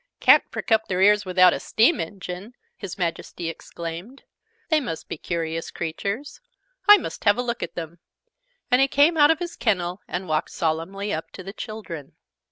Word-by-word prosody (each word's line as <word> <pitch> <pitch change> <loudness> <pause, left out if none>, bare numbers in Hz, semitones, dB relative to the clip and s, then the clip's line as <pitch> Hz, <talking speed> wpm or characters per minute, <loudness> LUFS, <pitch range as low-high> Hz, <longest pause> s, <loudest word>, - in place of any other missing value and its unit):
"Can't - - +6
prick - - -6
up 220 0 +3
their 185 -1 -1
ears 205 +1 +5
without 185 -1 +5
a - - -3
steam 240 +9 +3
engine!" 185 +5 -6 0.2
His 200 -2 -7
Majesty 170 -1 -3
exclaimed. 170 - -8 0.5
"They 315 -2 +4
must 200 - -5
be - - -4
curious 165 0 -3
creatures! 200 - -4 0.5
I 415 0 +10
must 355 - -7
have 205 0 +5
a 245 - 0
look 235 -1 -3
at - - -5
them!" 170 0 -7 0.7
And 250 +1 +5
he 270 - +5
came 290 +5 +4
out 295 -2 +6
of 325 - +4
his 345 +1 -5
Kennel, 180 -4 -1
and 180 +1 -4
walked 155 0 0
solemnly 170 +6 -2
up 160 - -4
to 185 - -9
the 195 +2 -8
children. 210 - -8
195 Hz, 180 wpm, -24 LUFS, 170-235 Hz, 0.7 s, I